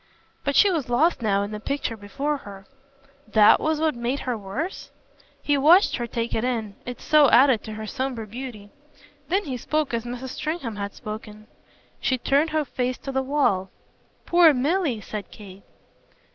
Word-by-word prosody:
But 280 0 -1
she 405 - +6
was 310 -8 -2
lost 290 +5 +2
now 200 -3 +1
in 205 - -5
the 210 - -5
picture 275 0 -3
before 270 +9 -3
her. 195 -6 -11 0.6
"THAT 210 -1 +6
was 315 -1 0
what 315 -1 +1
made 240 +3 -2
her 250 -2 -2
worse?" 225 - -5 0.5
He 290 -1 +2
watched 345 +8 +5
her 240 -1 -3
take 230 0 -3
it 220 - 0
in 225 -5 -2
it 245 -1 -6
so 300 -3 +5
added 255 -3 +5
to 215 - -6
her 215 0 -6
sombre 250 0 -3
beauty. 215 -2 -8 0.6
Then 385 +6 +1
he 265 -7 -4
spoke 305 +2 -1
as 230 -1 -1
Mrs. 245 +2 -6
Stringham 275 -7 -4
had 200 0 -5
spoken. 215 0 -8 0.5
"She 260 - 0
turned 280 +5 +2
her 310 -1 0
face 255 -1 -2
to 275 - -6
the 265 0 0
wall." 260 -9 +1 0.6
"Poor 345 -4 +6
Milly!" 285 - 0
said 205 -2 -7
Kate. 195 -2 -12
250 Hz, 175 wpm, -24 LUFS, 215-290 Hz, 0.6 s, she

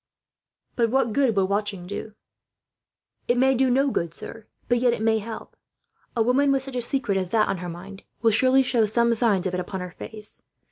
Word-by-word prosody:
"But 230 -2 +2
what 250 -2 +1
good 265 -4 +2
will 195 -1 +2
watching 200 -2 -2
do?" 205 +3 -7 1.1
"It 240 - +2
may 265 +1 +4
do 260 0 +2
no 270 +2 +2
good, 170 -5 -2
sir, 225 -2 -8 0.2
but 245 0 +2
yet 245 -1 +3
it 225 - -4
may 220 0 +3
help. 220 +1 -8 0.6
A 225 - +4
woman, 270 +4 +3
with 270 -1 +1
such 270 -1 -8
a 245 - 0
secret 235 -5 0
as 185 -2 -3
that 215 +2 +2
on 190 - -2
her 180 0 -5
mind, 190 +4 -9 0.2
will 225 - +5
surely 260 +4 +4
show 235 -4 +2
some 235 +2 +2
signs 215 -5 +1
of 185 - -1
it 180 - -1
upon 190 +1 -4
her 180 0 -6
face. 215 +2 -7
225 Hz, 215 wpm, -24 LUFS, 200-250 Hz, 1.1 s, will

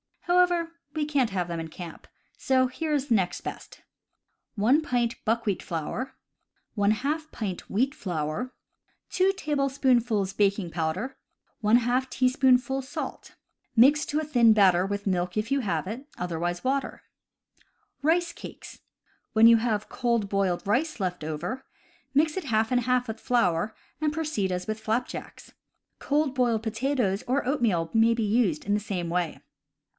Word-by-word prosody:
However, 350 -1 +2 0.2
we 305 -1 0
can't 280 -6 +1
have 180 -3 -2
them 170 -1 -4
in 165 - -4
camp; 165 +1 -10 0.3
so 260 -2 +2
here 305 +5 -3
is 285 -1 0
the 230 - +5
next 185 -4 0
best: - - -8 0.7
1 240 +9 +3
pint 245 -5 -1
buckwheat 220 -4 0
flour, 225 - -4 0.6
•J 220 - -1
" - - -25
wheat 260 +7 +1
flour, 180 - -3 0.6
2 380 +1 +3
tablespoonfuls 260 - +1
baking 200 -3 +1
powder, 180 +11 -2 0.5
\ 245 +4 +3
teaspoonful 255 0 +2
salt. 265 +2 -7 0.4
Mix 280 +6 +6
to 300 - 0
a - - -2
thin 240 -7 +5
batter 190 -3 +4
with 200 0 -3
milk, 180 -1 -1
if 215 +5 -1
you 275 - +3
have 210 -7 -1
it; 235 +9 -6
other 175 -2 -3
wise 175 +1 -2
water. 270 +1 -1 1.0
Rice 335 +3 +2
Cakes. - - -10 0.3
— - - -41
When 220 +1 +6
you 230 0 +8
have 220 -2 -1
cold 235 -4 0
boiled 195 -3 0
rice 255 +8 0
left 180 -4 -2
over, 165 - -4 0.5
mix 305 +2 +3
it 370 - -3
half 220 -3 +1
and 250 -1 +3
half 250 +1 +1
with 220 0 -5
flour, 220 -5 +1 0.2
and 305 -1 +1
proceed 305 -12 -1
as 180 0 -2
with 215 0 -3
flapjacks. 220 +3 -4 0.5
Cold 290 -1 +1
boiled 240 -4 +1
potatoes 230 -3 0
or 260 +2 +1
oatmeal 215 - +1
may 225 +1 +4
be 230 - -1
used 205 -7 +1
in 205 - +1
the 210 - +2
same 190 -5 -3
way. 175 -2 -1
230 Hz, 155 wpm, -27 LUFS, 195-270 Hz, 1.0 s, you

